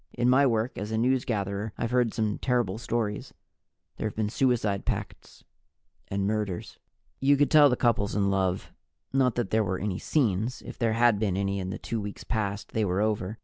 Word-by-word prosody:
In 120 +1 +3
my 135 +2 +5
work 115 -1 -1
as 105 +2 -5
a - - 0
newsgatherer, 110 -4 0
I've 115 - -2
heard 125 -2 +2
some 110 -2 -1
terrible 120 -3 0
stories. 110 -3 -3 0.6
There - - -1
have 105 - -7
been 105 -1 -1
suicide 115 -7 +1
pacts - - -5 0.6
and 100 0 -2
murders. 105 -3 -3 0.4
You 140 +1 +4
could 145 0 +2
tell 150 -2 +8
the 125 - +2
couples 115 -5 +1
in 100 -1 +2
love. 95 -1 -1 0.4
Not 130 -3 +2
that 120 -5 -2
there 110 0 +3
were 95 -2 -1
any 95 -2 -3
scenes. 115 -3 0
If - - -9
there 115 -2 +2
had 115 -2 +4
been 100 -4 0
any 100 0 -1
in 95 -1 -4
the - - -4
two 115 -1 -4
weeks 100 0 -7
past, 105 -3 -3
they 110 - 0
were 95 -1 0
over. 105 -1 -1
110 Hz, 195 wpm, -27 LUFS, 100-120 Hz, 0.6 s, tell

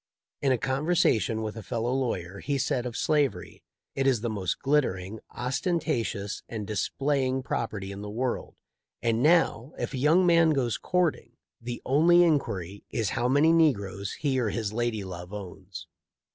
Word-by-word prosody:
In 135 - +2
a 130 - +3
conversation 130 -5 +1
with 110 0 -4
a 110 - -6
fellow 115 +3 -2
lawyer* 100 -8 -2
he 140 0 -1
said 125 -2 0
of 120 - -5
slavery: 145 -6 0 0.3
"It 135 0 0
is 125 -5 +2
the 120 -1 -2
most 95 -4 -2
glittering, 110 -8 0
ostentatious, 120 - -2
and 110 -3 -4
displaying 130 +5 0
property 105 -6 -3
in 100 +1 -7
the 105 - -6
world, 120 +4 -3 0.5
and 115 -1 +1
now, 155 -4 +3
if - - -3
a 130 - -3
young 160 +7 +4
man 170 -2 +5
goes 125 -5 0
courting, 170 -10 0 0.3
the 120 0 -6
only 170 +6 +5
inquiry 100 - -1
is 110 -4 -1
how 120 - 0
many 145 +5 +4
negroes 100 - +1
he 135 -3 0
or 115 -4 +1
his 105 0 -3
lady 120 -2 -1
love 90 -1 -8
owns. 95 -2 -8
120 Hz, 160 wpm, -27 LUFS, 105-145 Hz, 0.5 s, man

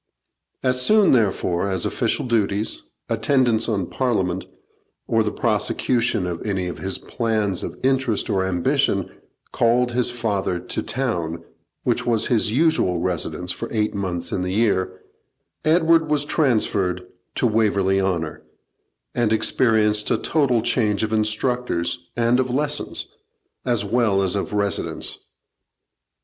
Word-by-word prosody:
As 130 -1 +2
soon, 210 +7 +5
therefore, 100 -6 +1
as 95 -1 0
official - - -1
duties, 110 -3 0 0.3
attendance 120 -5 +2
on 100 -5 0
Parliament, 95 -7 -1 0.6
or 115 - +2
the 105 -1 0
prosecution 115 -1 0
of 85 -2 -4
any 95 -3 -1
of 90 - -5
his 95 0 -2
plans 110 -6 -1
of - - -6
interest 130 -4 +1
or 95 -1 +1
ambition, 90 -2 0 0.4
called 120 +1 +2
his 125 0 +1
father 105 -7 -2
to - - -4
town, 85 -11 -3 0.4
which - - +1
was 115 -2 +1
his 110 -3 +2
usual 145 - +2
residence 90 0 -2
for - - -5
eight 105 -2 0
months 90 -4 -3
in 90 - -1
the 90 0 -2
year, 95 -4 0 0.6
Edward 160 0 +3
was 150 -1 +1
transferred 105 - 0 0.3
to - - 0
Waverley 100 -4 +2
Honour, 85 -5 -2 0.7
and 120 -3 +1
experienced 110 -1 +2
a - - +2
total 130 -8 +1
change 105 -4 +1
of 110 0 -2
instructors 110 -5 -1
and 120 +1 +3
of 130 0 0
lessons, 150 - -1 0.6
as 120 -4 +1
well 105 -3 +2
as 95 0 +1
of 100 - -2
residence. 100 -3 -2
110 Hz, 135 wpm, -22 LUFS, 95-125 Hz, 0.7 s, soon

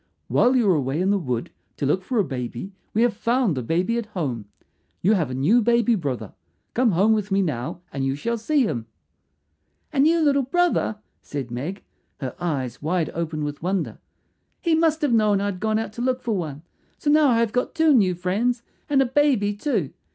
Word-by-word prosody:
"While 250 +2 +4
you 245 -3 +3
were 190 - +5
away 140 -1 -1
in 190 +2 +2
the 205 - +2
wood 125 -8 -3 0.3
to 145 - -1
look 150 +7 +1
for 245 +5 -2
a 210 - +4
baby 130 +4 -5 0.2
we 225 - +2
have 240 -2 +2
found 235 - +1
a 130 - -2
baby 180 - 0
at 230 - -6
home. 140 - -3 0.6
You 200 +5 +5
have 165 -10 +1
a 125 - -4
new 180 - +4
baby 235 0 +3
brother. 135 - -3 0.4
Come 235 -4 +2
home 200 +6 +4
with 210 -2 -1
me 195 0 +2
now 150 0 -3
and 135 -1 -2
you 135 0 0
shall 230 +11 -2
see 290 +4 +2
him." 120 - -2 1.1
"A 280 - -1
new 320 +4 +5
little 285 -2 +3
brother," 315 -5 +1 0.2
said 135 -4 -6
Meg, 150 +11 -5 0.4
her 130 -3 -5
eyes 135 -8 -3
wide 165 +1 0
open 160 -2 -3
with 145 0 -4
wonder. 185 +2 -2 0.6
"He 335 -2 +1
must 320 -1 +2
have 280 -5 +2
known 210 -3 +3
I 200 - -1
had 200 -3 -3
gone 215 +1 +1
out 220 -1 -3
to 235 - -6
look 255 0 0
for 230 -3 0
one. 155 -5 -4 0.3
So 290 - 0
now 305 0 +5
I 235 -3 +3
have 230 -2 +1
got 250 - -1
two 320 -2 +4
new 195 -8 +3
friends 220 +8 0 0.3
and 275 -2 +4
a - - -1
baby 255 -6 +2
too. 275 +8 -2
205 Hz, 210 wpm, -23 LUFS, 155-245 Hz, 1.1 s, were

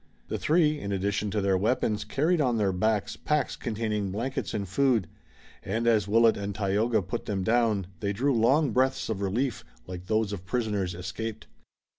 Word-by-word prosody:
The - - -2
three, 155 -2 +2
in 100 - -4
addition 100 +2 -1
to 105 +1 -1
their 100 -1 +2
weapons, 105 -1 0
carried 155 - +1
on 125 -4 +1
their 100 -3 +2
backs 105 +3 0
packs 150 0 -1
containing 110 -4 -2
blankets 120 +3 -3
and 100 -2 -3
food, 115 -1 +2 0.5
and 110 +4 -2
as 110 -4 +3
Willet 115 +2 +4
and 100 -1 -4
Tayoga 105 +2 +1
put 90 - -4
them 95 -2 -1
down 110 -2 +2
they 100 - -1
drew 135 +8 +1
long 130 +5 +3
breaths 130 +2 +1
of 105 -3 -2
relief 115 +5 -1 0.2
like 90 0 -8
those 110 -1 +1
of 95 -3 -6
prisoners 100 -4 -1
escaped. 105 +5 -5
110 Hz, 175 wpm, -27 LUFS, 100-120 Hz, 0.5 s, Willet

